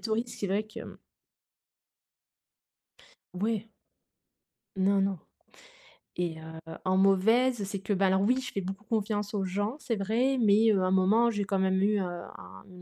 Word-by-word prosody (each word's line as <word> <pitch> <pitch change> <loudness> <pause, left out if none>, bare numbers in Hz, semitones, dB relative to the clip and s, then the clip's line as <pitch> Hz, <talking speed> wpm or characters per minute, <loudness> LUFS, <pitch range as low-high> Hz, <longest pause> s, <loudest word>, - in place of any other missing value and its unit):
touristes 230 +2 -2
c'est 200 - -2
vrai 200 +3 0
que, 215 - -10
hem. - - -10 2.4
Ouais. 215 +3 -1 1.1
Non, 195 +1 +2
non. 195 -2 0 1.0
Et 170 -2 -2
heu, 160 0 -9 0.3
en 185 0 +2
mauvaise, 220 +6 +3
c'est 195 +1 -4
que, 200 +2 -2
ben 195 0 +2
alors 190 +1 +2
oui, 250 +6 +2
je 255 - -6
fais 195 - -3
beaucoup 195 +3 -6
confiance 210 -2 -2
aux 195 - 0
gens 205 +6 -2
c'est 250 -6 -3
vrai 235 +7 +1
mais, 220 0 +5
heu, 195 -2 +2
à - - +1
un - - 0
moment 205 +5 +4
j'ai 205 -3 -1
quand 195 -1 -1
même 190 0 +2
eu, 210 +1 +2
heu, - - 0
un 95 - -8
une 180 -1 -13
200 Hz, 175 wpm, -29 LUFS, 190-220 Hz, 2.4 s, mais